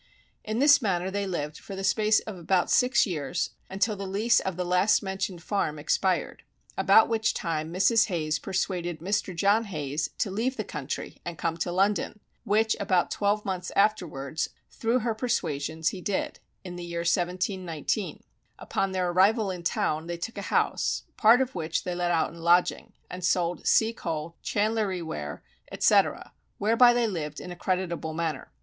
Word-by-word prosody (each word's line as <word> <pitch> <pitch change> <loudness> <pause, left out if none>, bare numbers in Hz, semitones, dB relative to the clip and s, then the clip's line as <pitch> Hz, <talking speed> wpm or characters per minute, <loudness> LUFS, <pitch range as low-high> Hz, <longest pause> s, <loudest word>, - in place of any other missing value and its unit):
In 215 +1 -3
this 285 +2 +6
manner 190 -4 0
they 200 0 -2
lived 150 -4 -4
for 195 - -8
the 195 - -5
space 215 +2 +3
of 215 - -7
about 180 +1 0
six 250 +1 +4
years, 160 - -2 0.2
until 200 +3 0
the 195 -1 -5
lease 215 +5 +3
of 190 -2 -4
the 180 - -1
last 180 +5 +3
mentioned 190 -3 -4
farm 185 -7 -1
expired; 180 +4 0 0.3
about 220 - +5
which 225 0 0
time 160 -3 -2
Mrs. 205 +6 +3
Hayes 155 -5 -1
persuaded 180 -3 -2
Mr. 185 +2 -2
John 200 +6 +3
Hayes 150 -5 -3
to 200 - -1
leave 240 +7 -1
the 215 - -1
country 150 -6 -6
and 170 -2 -6
come 165 -1 -1
to 170 +1 -2
London, 200 +3 0 0.3
which 220 +1 +2
about 185 -3 +1
twelve 205 +1 0
months 185 -2 -3
afterwards, 165 -8 0 0.2
through 235 +2 0
her 230 0 0
persuasions 160 - -1
he 185 - -7
did, 200 0 -2 0.2
in 180 -2 -7
the 175 - -6
year 170 0 -4
1719. 180 0 -1 0.3
Upon 195 -1 -2
their 180 -1 0
arrival 200 +3 +3
in 180 -2 -6
town 160 -2 -1
they 175 0 -4
took 225 +7 -5
a - - -6
house, - - +1
part 230 +4 +6
of 265 0 -1
which 160 +1 -2
they 180 - -3
let 175 0 -1
out 165 -2 +1
in 170 - -12
lodging, 175 +2 +2
and 180 0 -8
sold 175 -1 0
sea 225 +1 +4
coal, 165 -5 -4
chandlery 205 -4 0
ware, 75 - -6 0.3
etc., - - +2 0.2
whereby 230 +4 +5
they 240 -1 +2
lived 155 -8 -4
in 180 - -8
a - - -6
creditable 175 -3 -2
manner. 160 -5 -3
185 Hz, 175 wpm, -27 LUFS, 170-210 Hz, 0.3 s, this